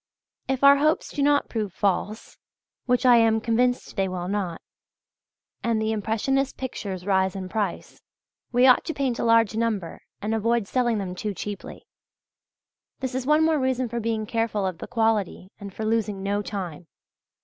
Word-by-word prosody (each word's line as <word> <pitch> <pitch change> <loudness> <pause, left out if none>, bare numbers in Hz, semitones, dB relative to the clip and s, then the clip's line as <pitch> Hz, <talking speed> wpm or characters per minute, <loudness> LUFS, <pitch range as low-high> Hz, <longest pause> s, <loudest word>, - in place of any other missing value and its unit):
If 265 0 -2
our 280 0 +8
hopes 305 +3 +1
do 290 - -2
not 285 0 +3
prove 215 -4 -3
false 205 +3 -2 0.5
which 250 +1 +2
I 245 -1 +7
am 225 -1 +4
convinced 245 +2 0
they 195 -1 +1
will 180 -1 -4
not 190 -4 -2 1.0
and 230 -2 +1
the 220 0 0
impressionist 225 +6 -1
pictures 195 -8 -5
rise 190 -1 +1
in 190 -1 -5
price, 205 -3 -3 0.5
we 245 +1 +4
ought 255 -1 +6
to 320 - -4
paint 260 -4 -1
a - - -1
large 230 -2 +4
number 220 -6 -2 0.2
and 215 +2 -2
avoid 225 -1 +1
selling 240 -2 +1
them 190 -3 -4
too 205 +2 -4
cheaply. 205 +2 -7 1.1
This 260 -1 -3
is 260 0 -3
one 300 +1 +4
more 320 -2 +2
reason 260 -1 0
for 235 +1 -3
being 225 -1 -2
careful 220 -2 -1
of 185 -3 -3
the - - -7
quality 220 -5 0
and 200 -1 -8
for 215 +3 -5
losing 215 -3 -1
no 200 +1 0
time. 180 -6 -6
220 Hz, 170 wpm, -25 LUFS, 200-250 Hz, 1.1 s, our